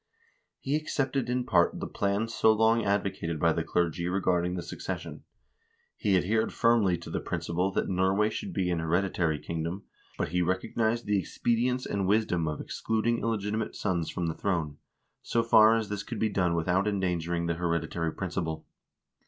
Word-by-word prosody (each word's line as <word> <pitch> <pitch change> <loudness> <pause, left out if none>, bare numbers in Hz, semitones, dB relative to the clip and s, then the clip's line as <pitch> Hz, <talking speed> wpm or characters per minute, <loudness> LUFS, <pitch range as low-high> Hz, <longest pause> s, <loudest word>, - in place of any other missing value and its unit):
He 140 +2 -2
accepted 135 -4 -1
in 125 0 0
part 85 -9 +2
the - - -3
plan 100 +2 -1
so 115 -1 +3
long 110 +1 +3
advocated 100 -5 -1
by 85 0 +3
the 85 - -1
clergy 85 +1 0
regarding 90 -1 +1
the 90 - -4
succes 85 - -5
sion. - - -9 0.7
He 100 -4 +2
adhered 110 +5 +1
firmly 110 -6 +3
to 85 - -10
the - - -1
principle 90 +3 -1
that - - 0
Norway 95 +3 +2
should 195 - -5
be 90 - 0
an 85 - 0
hereditary 85 -1 0
kingdom, 85 +5 -4 0.3
but - - -1
he 90 +2 0
recognized 110 +6 0
the 105 -1 +2
expedience 120 +6 0
and 100 -2 -1
wisdom 95 -6 +1
of 75 -1 -3
excluding 115 +1 -1
illegitimate 110 -1 -2
sons 85 -5 -1
from 85 - -3
the 80 - -1
throne, 80 -7 -2 0.4
so 115 - 0
far 110 -1 +6
as 110 -2 -1
this 105 -1 -3
could - - -6
be 110 - +1
done 90 -4 +1
without 90 +4 +1
endangering 85 -4 -1
the 85 - 0
hereditary 85 -1 -1
principle. 80 -4 -4
95 Hz, 170 wpm, -28 LUFS, 85-110 Hz, 0.7 s, far